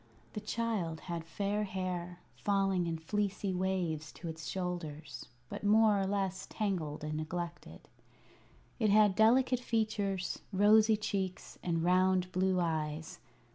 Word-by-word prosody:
The 210 - -4
child 210 -8 -2
had 170 -2 -4
fair 200 +5 -1
hair, 180 -2 -4
falling 195 -3 +1
in 165 -1 -2
fleecy 200 +3 -1
waves 180 -5 -1
to 175 - -8
its 160 -3 -6
shoulders, 160 -8 -5 0.2
but - - -7
more 210 0 +5
or 190 - 0
less 195 -2 -2
tangled 175 -9 -2
and 155 0 -3
neglected. 170 +2 -5 0.9
It 215 -3 +3
had 210 -1 +6
delicate 245 +4 +4
features, 210 -6 -1
rosy 215 +2 +5
cheeks, 190 -3 -3
and 165 -2 -1
round 185 +1 +3
blue 185 0 +2
eyes. 160 -2 -2
185 Hz, 130 wpm, -33 LUFS, 170-205 Hz, 0.9 s, had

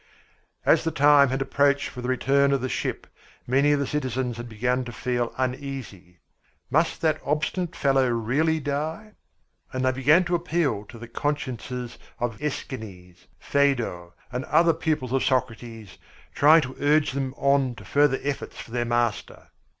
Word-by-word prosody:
As - - +4
the 165 - 0
time 145 -2 +5
had 135 +1 -1
approached 140 +1 +2
for 125 - -8
the 125 - -4
return 140 +2 +2
of 135 - 0
the 130 - -1
ship, - - -3 0.4
many 135 +4 +3
of 145 - +2
the 140 - 0
citizens 130 -4 -2
had 120 0 -7
begun 125 +3 -1
to 120 - -7
feel 120 0 -2
uneasy. 130 -9 -5 0.5
Must 160 +3 +1
that 155 -1 +1
obstinate 155 +4 -2
fellow 135 -2 +2
really 135 +8 +1
die? 155 +9 -3 0.6
And 130 0 -2
they 130 - +3
began 145 +7 +4
to 180 0 -3
appeal 165 - 0
to 115 - -12
the 120 +1 -9
consciences 125 -3 -4 0.2
of 115 -3 -3
Æschines, 95 -11 -7
Phædo, 120 -12 0 0.2
and 125 +1 -3
other 170 0 +4
pupils 140 -7 -2
of 135 - +1
Socrates, 115 -5 -3 0.3
trying 155 +3 +6
to 130 -2 -6
urge 150 +1 +3
them 135 -1 -3
on 140 -3 +2
to - - -12
further 145 -2 +3
efforts 140 -1 -4
for - - -9
their 120 0 -1
master. 120 -2 -2
130 Hz, 160 wpm, -25 LUFS, 120-145 Hz, 0.6 s, trying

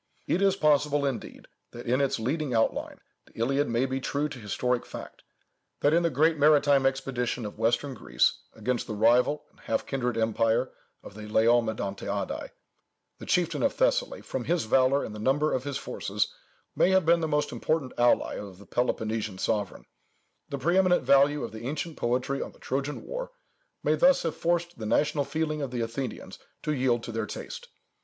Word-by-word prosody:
It 180 - 0
is 195 -1 +4
possible, 150 -3 +2
indeed, 135 -4 -5 0.3
that 120 +1 -8
in 125 +3 +2
its 140 - +1
leading 135 +3 -1
outline, 115 - 0 0.3
the - - -22
Iliad 135 +5 +1
may 120 +3 +1
be 135 0 -3
true 145 +3 -1
to 130 - -8
historic 120 +3 -1
fact, - - -9 0.6
that 145 - +4
in 170 - +4
the 170 - +2
great 155 +3 +2
maritime 145 -2 +5
expedition 125 -3 -2
of 105 +1 -8
western 120 +5 +1
Greece 65 - +1 0.2
against 120 +3 -2
the 110 - -4
rival 125 +7 +3
and - - -27
half 115 - -2
kindred 125 -3 -2
empire 115 0 +1 0.3
of - - -11
the 105 +1 -9
Laomedontiadæ, 110 -2 0 0.7
the - - -8
chieftain 175 -2 +1
of 280 - +2
Thessaly, - - +1
from - - -4
his 170 -5 0
valour 130 +4 +3
and 105 - -6
the 105 - -7
number 145 +7 +1
of 130 +1 -1
his 140 -2 -2
forces, - - -2 0.4
may - - +4
have 190 -2 +3
been 170 +1 +5
the 160 - 0
most 150 -1 0
important 155 -5 -1
ally 120 0 +2
of 100 -3 -9
the 100 - -14
Peloponnesian 110 -4 -1
sovereign; 105 -1 -2 0.6
the 140 - -3
preeminent 180 +5 +3
value 140 +1 +4
of - - -5
the 110 +2 -7
ancient 155 +3 -4
poetry 125 +3 -1
on - - -6
the - - -21
Trojan 140 +3 -3
war - - -5 0.5
may 150 - +3
thus 265 - +4
have 165 - -2
forced 170 -3 -1
the 110 - -4
national 145 +4 +1
feeling 155 +1 -2
of 140 - -2
the 125 -1 -3
Athenians 115 +3 -5 0.2
to 150 - 0
yield 125 -4 +1
to 120 - -5
their 115 0 -2
taste. 485 - -7
135 Hz, 185 wpm, -28 LUFS, 115-150 Hz, 0.7 s, maritime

